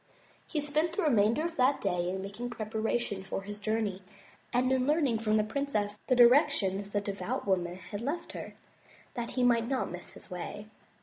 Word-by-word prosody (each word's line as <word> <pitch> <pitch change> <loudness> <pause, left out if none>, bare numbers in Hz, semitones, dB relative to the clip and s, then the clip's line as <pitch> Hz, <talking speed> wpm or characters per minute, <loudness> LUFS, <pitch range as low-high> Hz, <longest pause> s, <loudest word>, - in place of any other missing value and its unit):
He 310 - -1
spent 305 +3 0
the 390 - 0
remainder 235 +1 +3
of 335 -1 -4
that 265 +2 +4
day 180 -3 0
in 190 +1 -3
making 205 +5 -5
preparations 220 -3 -2
for 195 - -3
his 205 +1 -7
journey 210 -2 -1 0.5
and 255 +1 +2
in 260 0 +2
learning 290 -7 +2
from 215 -1 +2
the 215 - +3
princess 215 -4 -2
the 255 - +4
directions 235 - +5
the 205 0 0
devout 205 +5 -3
woman 180 -3 0
had 205 +3 -7
left 290 +8 -3
her, - - -7 0.6
that 235 -1 -3
he 250 - +3
might 235 -2 +4
not 260 -7 -1
miss 180 0 -8
his - - -11
way. 180 +3 -5
225 Hz, 185 wpm, -30 LUFS, 200-260 Hz, 0.6 s, directions